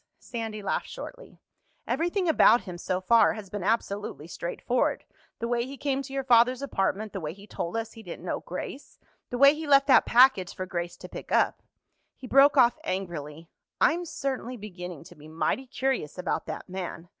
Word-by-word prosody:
Sandy 225 Hz, -3 st, -6 dB
laughed -, -, -1 dB
shortly. -, -, -10 dB, 0.5 s
"Everything 350 Hz, +3 st, 0 dB
about 275 Hz, -6 st, +6 dB
him 180 Hz, -3 st, -8 dB
so 185 Hz, +1 st, -1 dB
far 230 Hz, +5 st, +5 dB
has 210 Hz, -4 st, -9 dB
been 205 Hz, -, -4 dB
absolutely 205 Hz, -6 st, -1 dB
straightforward—the 230 Hz, +6 st, -3 dB
way 235 Hz, 0 st, 0 dB
he 275 Hz, +1 st, -8 dB
came 275 Hz, 0 st, -1 dB
to 275 Hz, -, -9 dB
your 270 Hz, 0 st, -2 dB
father's 250 Hz, +1 st, +4 dB
apartment, 210 Hz, -4 st, -1 dB
the 195 Hz, -, -3 dB
way 155 Hz, -2 st, -4 dB
he 200 Hz, +2 st, -14 dB
told 175 Hz, -1 st, -4 dB
us 225 Hz, 0 st, -3 dB
he 225 Hz, -, -12 dB
didn't 175 Hz, -3 st, -9 dB
know -, -, -2 dB
Grace, 220 Hz, +10 st, -7 dB, 0.3 s
the 245 Hz, -, -3 dB
way 280 Hz, +2 st, +8 dB
he 310 Hz, 0 st, -6 dB
left 275 Hz, -1 st, +6 dB
that 275 Hz, -, +5 dB
package 240 Hz, -7 st, +5 dB
for 185 Hz, -, -4 dB
Grace 175 Hz, -2 st, -4 dB
to -, -, -10 dB
pick -, -, -9 dB
up—" -, -, +2 dB, 0.5 s
He -, -, -11 dB
broke 275 Hz, +3 st, +5 dB
off 240 Hz, -2 st, +5 dB
angrily. 165 Hz, -4 st, -5 dB, 0.3 s
"I'm 345 Hz, +3 st, +3 dB
certainly 260 Hz, -5 st, -4 dB
beginning 180 Hz, -6 st, -8 dB
to -, -, -14 dB
be 150 Hz, +1 st, -14 dB
mighty 165 Hz, +11 st, -1 dB
curious 260 Hz, -, -2 dB
about 180 Hz, -, -2 dB
that -, -, -6 dB
man. 180 Hz, -2 st, -6 dB
225 Hz, 185 wpm, -27 LUFS, 180-270 Hz, 0.5 s, way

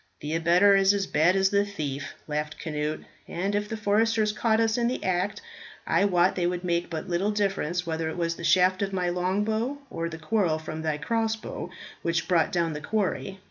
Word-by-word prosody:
"The 150 Hz, +1 st, -3 dB
abettor 175 Hz, +5 st, +5 dB
is 195 Hz, +1 st, +4 dB
as 200 Hz, -1 st, 0 dB
bad 170 Hz, +2 st, +3 dB
as 190 Hz, 0 st, +3 dB
the 200 Hz, 0 st, +3 dB
thief," 145 Hz, -8 st, -5 dB
laughed 150 Hz, 0 st, -3 dB
Cnut, 150 Hz, -1 st, -3 dB, 0.3 s
"and 195 Hz, +4 st, -2 dB
if 210 Hz, 0 st, -1 dB
the 225 Hz, -, -3 dB
foresters 215 Hz, +1 st, +2 dB
caught 220 Hz, +1 st, +1 dB
us 225 Hz, -1 st, +2 dB
in 235 Hz, -1 st, +1 dB
the 250 Hz, -, -2 dB
act, 190 Hz, -, -1 dB, 0.4 s
I 200 Hz, -, +3 dB
wot 180 Hz, -2 st, +3 dB
they 175 Hz, -2 st, +1 dB
would 180 Hz, 0 st, -2 dB
make 170 Hz, -1 st, 0 dB
but 160 Hz, +2 st, -5 dB
little 180 Hz, +3 st, 0 dB
difference 195 Hz, -4 st, -1 dB
whether 160 Hz, -1 st, -2 dB
it 160 Hz, -, -6 dB
was 170 Hz, -1 st, -1 dB
the 170 Hz, -, -9 dB
shaft 185 Hz, +3 st, +4 dB
of 195 Hz, -1 st, -1 dB
my 180 Hz, -2 st, 0 dB
longbow 210 Hz, +9 st, 0 dB
or 165 Hz, 0 st, -3 dB
the 160 Hz, -, -7 dB
quarrel 165 Hz, 0 st, +1 dB
from 155 Hz, 0 st, -6 dB
thy 155 Hz, -2 st, -1 dB
crossbow 220 Hz, +6 st, -2 dB, 0.3 s
which 170 Hz, 0 st, -1 dB
brought 170 Hz, -3 st, +2 dB
down 170 Hz, -2 st, 0 dB
the 150 Hz, -, -5 dB
quarry. 195 Hz, 0 st, -2 dB
180 Hz, 205 wpm, -27 LUFS, 165-205 Hz, 0.4 s, abettor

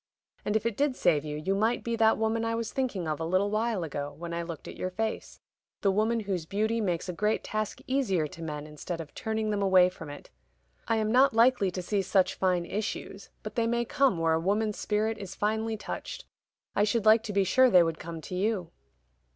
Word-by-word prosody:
And 210 Hz, -, -1 dB
if 220 Hz, -, +1 dB
it 230 Hz, -3 st, 0 dB
did 280 Hz, 0 st, +1 dB
save 150 Hz, -, +2 dB
you, 150 Hz, -1 st, -4 dB
you 175 Hz, +6 st, -1 dB
might 220 Hz, +4 st, +1 dB
be 235 Hz, 0 st, -1 dB
that 220 Hz, -1 st, +4 dB
woman 220 Hz, +1 st, 0 dB
I 230 Hz, 0 st, 0 dB
was 230 Hz, -1 st, -3 dB
thinking 235 Hz, -10 st, -2 dB
of 155 Hz, 0 st, -2 dB
a -, -, -2 dB
little 185 Hz, +5 st, +1 dB
while 215 Hz, -3 st, 0 dB
ago 145 Hz, -2 st, -4 dB
when 170 Hz, +1 st, -6 dB
I 170 Hz, -, -2 dB
looked 165 Hz, -3 st, -7 dB
at -, -, -8 dB
your 185 Hz, -, -3 dB
face: 220 Hz, +4 st, -4 dB, 0.4 s
the 200 Hz, -, +3 dB
woman 220 Hz, +3 st, +1 dB
whose 185 Hz, -6 st, -3 dB
beauty 220 Hz, +4 st, 0 dB
makes 180 Hz, -3 st, -1 dB
a 180 Hz, -, -3 dB
great 210 Hz, +5 st, 0 dB
task 215 Hz, -1 st, -3 dB
easier 235 Hz, -, +1 dB
to 160 Hz, +3 st, -9 dB
men 150 Hz, -2 st, -5 dB
instead 155 Hz, +3 st, -6 dB
of 155 Hz, -3 st, -8 dB
turning 220 Hz, -1 st, -2 dB
them 205 Hz, -1 st, -1 dB
away 185 Hz, -2 st, +5 dB
from 165 Hz, -4 st, -10 dB
it. 145 Hz, -, -10 dB, 0.6 s
I 225 Hz, -, +2 dB
am 215 Hz, -1 st, 0 dB
not 255 Hz, 0 st, +5 dB
likely 230 Hz, -4 st, +4 dB
to 180 Hz, 0 st, -5 dB
see 200 Hz, +2 st, 0 dB
such 190 Hz, -1 st, +2 dB
fine 180 Hz, -2 st, +1 dB
issues; 200 Hz, 0 st, -5 dB
but 215 Hz, -, -6 dB
they 230 Hz, 0 st, +1 dB
may 235 Hz, 0 st, 0 dB
come 275 Hz, -6 st, +2 dB
where 165 Hz, -1 st, +2 dB
a 160 Hz, -, +2 dB
woman's 210 Hz, +4 st, 0 dB
spirit 220 Hz, +1 st, 0 dB
is 195 Hz, -3 st, -7 dB
finely 220 Hz, +1 st, -1 dB
touched. -, -, -6 dB, 0.5 s
I 205 Hz, -, +3 dB
should 215 Hz, +1 st, +1 dB
like 220 Hz, +1 st, +7 dB
to 210 Hz, -, -4 dB
be 200 Hz, 0 st, +3 dB
sure 255 Hz, +7 st, +5 dB
they 180 Hz, -5 st, +7 dB
would 165 Hz, -1 st, -2 dB
come 165 Hz, -1 st, -7 dB
to 180 Hz, -, -8 dB
you." 185 Hz, -2 st, -1 dB
205 Hz, 230 wpm, -28 LUFS, 175-225 Hz, 0.6 s, like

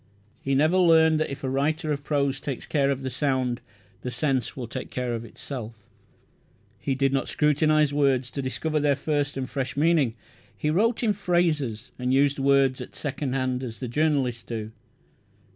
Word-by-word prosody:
He 135 Hz, 0 st, 0 dB
never 155 Hz, +6 st, +3 dB
learned 160 Hz, -3 st, +5 dB
that 155 Hz, -, 0 dB
if 140 Hz, -, -7 dB
a 130 Hz, -, -1 dB
writer 155 Hz, +3 st, 0 dB
of 145 Hz, -1 st, -2 dB
prose 140 Hz, -2 st, 0 dB
takes 135 Hz, -4 st, -4 dB
care 140 Hz, -3 st, +1 dB
of 135 Hz, -1 st, -1 dB
the 130 Hz, -, -3 dB
sound 130 Hz, -2 st, 0 dB, 0.4 s
the 125 Hz, -, -4 dB
sense 130 Hz, 0 st, -1 dB
will 125 Hz, -, -4 dB
take -, -, -6 dB
care 125 Hz, -1 st, -2 dB
of 115 Hz, -1 st, -3 dB
itself. 115 Hz, 0 st, -7 dB, 1.0 s
He 135 Hz, -, -1 dB
did 135 Hz, 0 st, +1 dB
not 135 Hz, -, 0 dB
scrutinize 150 Hz, 0 st, +2 dB
words 135 Hz, -4 st, +2 dB
to 140 Hz, -, -3 dB
discover 150 Hz, +4 st, -1 dB
their 145 Hz, -1 st, +3 dB
first 145 Hz, 0 st, -1 dB
and 130 Hz, -1 st, -2 dB
fresh 135 Hz, -1 st, -3 dB
meaning. 150 Hz, -6 st, +3 dB, 0.4 s
He 150 Hz, -, 0 dB
wrote 225 Hz, +8 st, +2 dB
in 215 Hz, -3 st, +3 dB
phrases, 155 Hz, -, 0 dB
and 125 Hz, 0 st, 0 dB
used 140 Hz, +1 st, +3 dB
words 135 Hz, -1 st, +3 dB
at -, -, -9 dB
second 145 Hz, -2 st, -3 dB
hand 130 Hz, -1 st, -1 dB
as 115 Hz, -5 st, -6 dB
the 125 Hz, -, -4 dB
journalists 135 Hz, -3 st, +1 dB
do. 110 Hz, -2 st, -5 dB
140 Hz, 180 wpm, -26 LUFS, 130-150 Hz, 1.0 s, learned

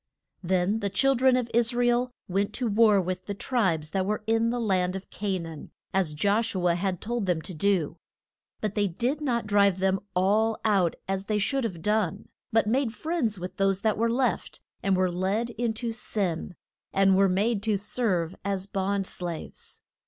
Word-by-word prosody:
Then 185 Hz, +3 st, +1 dB
the 200 Hz, -2 st, -1 dB
chil 270 Hz, +8 st, +3 dB
dren 260 Hz, 0 st, +4 dB
of 245 Hz, -2 st, -1 dB
Is 235 Hz, +1 st, +2 dB
ra 245 Hz, 0 st, +2 dB
el 240 Hz, +1 st, +2 dB, 0.2 s
went 195 Hz, +2 st, 0 dB
to 255 Hz, -, -2 dB
war 215 Hz, -1 st, +5 dB
with 185 Hz, 0 st, -3 dB
the 200 Hz, -, -3 dB
tribes 185 Hz, -11 st, 0 dB
that 190 Hz, -1 st, 0 dB
were 210 Hz, +2 st, -2 dB
in 225 Hz, +1 st, +2 dB
the 245 Hz, +1 st, -1 dB
land 185 Hz, -5 st, +1 dB
of 190 Hz, -, -8 dB
Ca 200 Hz, -2 st, -2 dB
naan, 165 Hz, -3 st, -8 dB, 0.2 s
as 180 Hz, -6 st, +1 dB
Josh 205 Hz, +7 st, +1 dB
u 180 Hz, -1 st, +1 dB
a 170 Hz, -, +4 dB
had 180 Hz, 0 st, -1 dB
told 235 Hz, -2 st, -2 dB
them 175 Hz, -3 st, +1 dB
to 185 Hz, -, -7 dB
do. 170 Hz, -2 st, 0 dB, 0.6 s
But 215 Hz, -2 st, -1 dB
they 205 Hz, -1 st, +1 dB
did 245 Hz, -, -1 dB
not 240 Hz, -6 st, 0 dB
drive 200 Hz, -2 st, +3 dB
them 190 Hz, 0 st, +1 dB, 0.2 s
all 215 Hz, +4 st, +2 dB
out, 195 Hz, -6 st, +3 dB
as 195 Hz, 0 st, -2 dB
they 215 Hz, -, +1 dB
should 265 Hz, +7 st, 0 dB
have 175 Hz, -7 st, -5 dB
done, 210 Hz, -2 st, 0 dB, 0.2 s
but 225 Hz, 0 st, +3 dB
made 235 Hz, +1 st, 0 dB
friends 245 Hz, -, -1 dB
with 180 Hz, +1 st, -7 dB
those 195 Hz, -1 st, +2 dB
that 220 Hz, -2 st, +2 dB
were 230 Hz, +2 st, +1 dB
left, 250 Hz, +2 st, -1 dB, 0.2 s
and 195 Hz, -1 st, +2 dB
were 185 Hz, -1 st, +2 dB
led 195 Hz, +7 st, -1 dB
in 235 Hz, 0 st, -1 dB
to 230 Hz, +1 st, -3 dB
sin, 190 Hz, -6 st, -3 dB, 0.4 s
and 195 Hz, 0 st, +4 dB
were 195 Hz, 0 st, +4 dB
made 200 Hz, +3 st, +1 dB
to 210 Hz, -1 st, +1 dB
serve 190 Hz, -5 st, -1 dB
as 195 Hz, -1 st, -1 dB
bond 195 Hz, 0 st, -1 dB
slaves. 175 Hz, -3 st, -7 dB
200 Hz, 195 wpm, -27 LUFS, 185-225 Hz, 0.6 s, war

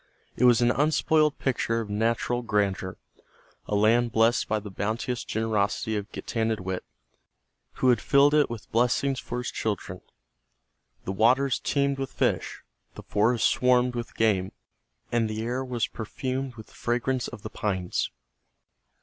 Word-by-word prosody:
It 125 Hz, -, +2 dB
was 120 Hz, -1 st, +6 dB
an 120 Hz, 0 st, +4 dB
unspoiled 155 Hz, +1 st, +2 dB
picture 115 Hz, -3 st, 0 dB
of 115 Hz, -, -4 dB
natural 115 Hz, +3 st, 0 dB
grandeur, 100 Hz, -4 st, -1 dB, 0.7 s
a 105 Hz, -, -1 dB
land 115 Hz, +3 st, +3 dB
blessed 115 Hz, +2 st, +3 dB
by 110 Hz, -, +1 dB
the 105 Hz, -1 st, -9 dB
bounteous 110 Hz, +5 st, -2 dB
generosity 110 Hz, 0 st, -1 dB
of 105 Hz, 0 st, -4 dB
Getanittowit, 110 Hz, -5 st, -2 dB, 0.9 s
who 130 Hz, -, +2 dB
had 120 Hz, -, +3 dB
filled 140 Hz, +1 st, +4 dB
it 150 Hz, -1 st, +4 dB
with 115 Hz, -2 st, -8 dB
blessings 125 Hz, +3 st, +1 dB
for 120 Hz, -, -5 dB
his 125 Hz, -1 st, -3 dB
children. 95 Hz, -4 st, -3 dB, 1.0 s
The -, -, -2 dB
waters 125 Hz, +6 st, +3 dB
teemed 140 Hz, -1 st, 0 dB
with 135 Hz, -1 st, -3 dB
fish, -, -, -1 dB, 0.3 s
the -, -, -9 dB
forests 110 Hz, +3 st, +2 dB
swarmed 125 Hz, 0 st, +3 dB
with 120 Hz, -1 st, -5 dB
game, 100 Hz, -4 st, +1 dB, 0.6 s
and 115 Hz, -2 st, +1 dB
the 110 Hz, +1 st, -3 dB
air 125 Hz, +3 st, -2 dB
was 125 Hz, -3 st, -1 dB
perfumed 130 Hz, +3 st, -4 dB
with 110 Hz, -2 st, -10 dB
the -, -, -22 dB
fragrance 125 Hz, +2 st, -1 dB
of 100 Hz, -, -10 dB
the -, -, -6 dB
pines. 95 Hz, -4 st, -2 dB
115 Hz, 150 wpm, -26 LUFS, 110-125 Hz, 1.0 s, was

